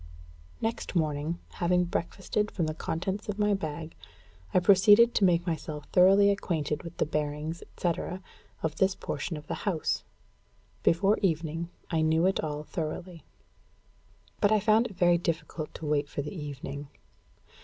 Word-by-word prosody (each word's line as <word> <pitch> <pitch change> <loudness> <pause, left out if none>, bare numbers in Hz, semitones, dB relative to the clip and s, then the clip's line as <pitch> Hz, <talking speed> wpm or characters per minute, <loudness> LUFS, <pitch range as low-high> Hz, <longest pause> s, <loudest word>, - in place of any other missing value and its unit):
Next 225 -3 -3
morning, 155 0 0 0.2
having 180 +1 +3
breakfasted 195 +5 -2
from 170 - -1
the 155 - -2
contents 190 +6 -3
of 205 - -2
my 210 -1 +2
bag, 160 -3 -4 0.6
I - - +2
proceeded 205 +5 +6
to - - +2
make 175 -2 +4
myself 155 -3 -4
thoroughly 195 +2 +6
acquainted 155 -7 -1
with 170 -2 -9
the - - +2
bearings, 150 +2 -3
etc., 175 +1 -3 0.4
of 160 -1 -1
this 190 0 +3
portion 165 - -4
of 150 - -10
the - - -4 0.2
house. 165 -5 -1 0.8
Before 195 +5 +3
evening, 165 -2 -1 0.2
I 165 -1 +2
knew 160 +2 +3
it 190 - +2
all 150 -1 -3
thoroughly. 165 +2 -5 1.2
But 205 - +3
I 215 - +5
found 220 +3 +3
it 205 - -12
very 175 -1 +4
difficult 160 -2 -3
to 160 - -7
wait 145 -1 0
for 145 - -3
the 150 - -6
evening. 145 -2 -6
170 Hz, 155 wpm, -29 LUFS, 155-195 Hz, 1.2 s, proceeded